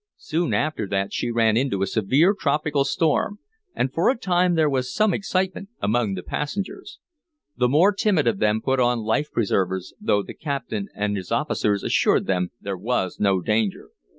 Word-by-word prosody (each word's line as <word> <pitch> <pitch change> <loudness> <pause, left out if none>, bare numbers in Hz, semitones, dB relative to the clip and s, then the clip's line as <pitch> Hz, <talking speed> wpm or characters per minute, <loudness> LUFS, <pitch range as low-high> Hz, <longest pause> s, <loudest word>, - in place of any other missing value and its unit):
Soon 175 - -2
after 150 -9 -1
that 100 0 -2
she - - -1
ran 115 -2 +2
into 115 -6 0
a - - +2
severe 130 - +3
tropical 150 -5 0
storm, 160 +8 0 0.4
and 130 +1 -1
for 165 - +2
a 260 - +1
time 180 -5 +2
there 160 -2 +3
was 130 -3 -1
some 210 +8 +2
excitement 190 0 -2
among 110 -2 0
the 90 - -6
passengers. 200 - -5 0.6
The 125 -1 +2
more 170 +10 +4
timid 195 -6 +1
of 115 -5 +1
them 110 +1 +1
put 135 0 +1
on 120 -1 +2
life 110 +8 0
preservers, 95 -4 -1
though 100 - +1
the - - -9
captain 135 -9 -4
and 105 0 -1
his 95 0 -6
officers 110 -6 0
assured - - +2
them 90 -2 0
there 100 -1 -4
was 100 -3 -2
no 100 -3 +2
danger. 105 +1 -1
125 Hz, 180 wpm, -23 LUFS, 105-165 Hz, 0.6 s, more